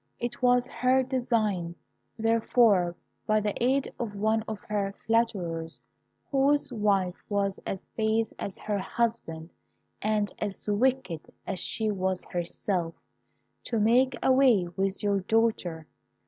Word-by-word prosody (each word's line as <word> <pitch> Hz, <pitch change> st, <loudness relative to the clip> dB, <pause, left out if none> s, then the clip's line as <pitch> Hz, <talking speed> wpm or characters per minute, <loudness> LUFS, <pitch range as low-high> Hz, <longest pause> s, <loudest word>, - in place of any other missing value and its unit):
It 240 Hz, +1 st, -4 dB
was 245 Hz, 0 st, +4 dB
her 260 Hz, +1 st, +2 dB
design, 225 Hz, -9 st, 0 dB, 0.4 s
therefore, 225 Hz, -5 st, +3 dB, 0.3 s
by 215 Hz, 0 st, +4 dB
the 210 Hz, -1 st, -1 dB
aid 265 Hz, +2 st, +1 dB
of 220 Hz, -4 st, -3 dB
one 220 Hz, +2 st, +1 dB
of 220 Hz, -, -3 dB
her 200 Hz, -2 st, -2 dB
flatterers, 175 Hz, -8 st, 0 dB, 0.5 s
whose 280 Hz, -1 st, +2 dB
wife 200 Hz, -5 st, +1 dB
was 200 Hz, -1 st, 0 dB
as 190 Hz, -, -4 dB
base 220 Hz, 0 st, 0 dB
as 195 Hz, -, -4 dB
her 210 Hz, -1 st, -2 dB
husband, 185 Hz, -7 st, -2 dB, 0.5 s
and 210 Hz, -1 st, +1 dB
as 205 Hz, -1 st, -4 dB
wicked 210 Hz, -6 st, 0 dB
as 185 Hz, -, -2 dB
she 220 Hz, +4 st, 0 dB
was 190 Hz, -2 st, -1 dB
herself, 175 Hz, 0 st, -2 dB, 0.7 s
to 230 Hz, -, -1 dB
make 245 Hz, +4 st, +3 dB
away 255 Hz, -8 st, +5 dB
with 195 Hz, +1 st, -1 dB
your 200 Hz, -1 st, +2 dB
daughter. 190 Hz, -6 st, 0 dB
215 Hz, 125 wpm, -28 LUFS, 190-235 Hz, 0.7 s, away